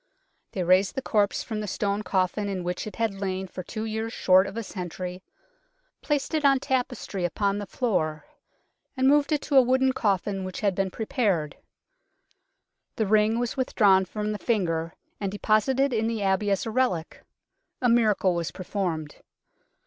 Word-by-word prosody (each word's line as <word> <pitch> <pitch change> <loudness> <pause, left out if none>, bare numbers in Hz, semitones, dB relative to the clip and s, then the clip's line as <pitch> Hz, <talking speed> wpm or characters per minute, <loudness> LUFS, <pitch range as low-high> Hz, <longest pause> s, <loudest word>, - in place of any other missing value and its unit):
They 185 - -1
raised 185 +3 +3
the 265 - -2
corpse 205 -2 +1
from 220 -2 -4
the 210 - -4
stone 200 +1 -1
coffin 190 +1 0
in 190 -2 -3
which 180 +4 -3
it 215 - -8
had 225 -3 0
lain 190 -1 -2
for 185 - -7
two 215 +4 -5
years 220 +1 -3
short 190 -3 +4
of 195 +3 -7
a 230 - -2
century, 180 -1 -6 0.8
placed 295 +1 -1
it 310 -1 +1
on 275 -1 +5
tapestry 250 -7 -2
upon 200 +3 0
the 205 - -6
floor, 155 - -1 0.7
and 260 0 +3
moved 290 +2 +4
it 300 -2 +1
to 285 - +2
a - - +10
wooden 260 +1 +2
coffin 195 -3 0
which 185 0 -6
had 200 -2 +2
been 195 +1 -1
prepared. 195 -7 -1 1.4
The 220 - 0
ring 215 +2 +3
was 240 -1 -2
with 260 -2 -3
drawn 190 -4 +5
from 210 +3 -3
the 210 - -4
finger 165 -8 -1 0.2
and 200 -2 -2
deposited 245 +6 +2
in 220 -1 +1
the 225 -3 -2
Abbey 195 +2 +1
as 195 -1 0
a 225 - -3
relic. 215 -10 -1 0.6
A 250 - +2
miracle 215 -6 +3
was 170 -1 -2
performed. 175 -5 -4
205 Hz, 175 wpm, -26 LUFS, 185-230 Hz, 1.4 s, a